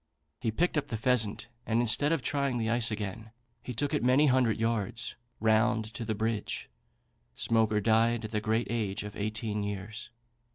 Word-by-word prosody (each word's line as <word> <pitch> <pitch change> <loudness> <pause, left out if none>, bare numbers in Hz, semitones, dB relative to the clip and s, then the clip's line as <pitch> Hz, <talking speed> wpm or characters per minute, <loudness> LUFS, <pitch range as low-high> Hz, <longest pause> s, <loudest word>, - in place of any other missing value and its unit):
He 115 - -1
picked 160 +8 +1
up 145 - -7
the 115 - -3
pheasant, 115 -2 +2 0.2
and 115 0 0
instead 120 +6 +4
of 165 -6 0
trying 140 -1 0
the 110 -1 -1
ice 120 -1 +4
again, 110 0 -5 0.3
he 125 - -6
took 145 +5 -2
it 150 - 0
many 130 +4 +4
hundred 130 -5 +3
yards 115 0 -1 0.2
round 110 0 +2
to 120 - -5
the 110 -1 -2
bridge. 110 0 -3 0.6
Smoaker 110 - +2
died 115 +2 +2
at 110 - -7
the 105 -1 -1
great 110 +2 0
age 105 -5 -2
of 105 0 -8
eighteen 105 0 -2
years. 105 +4 -5
115 Hz, 175 wpm, -29 LUFS, 110-120 Hz, 0.6 s, instead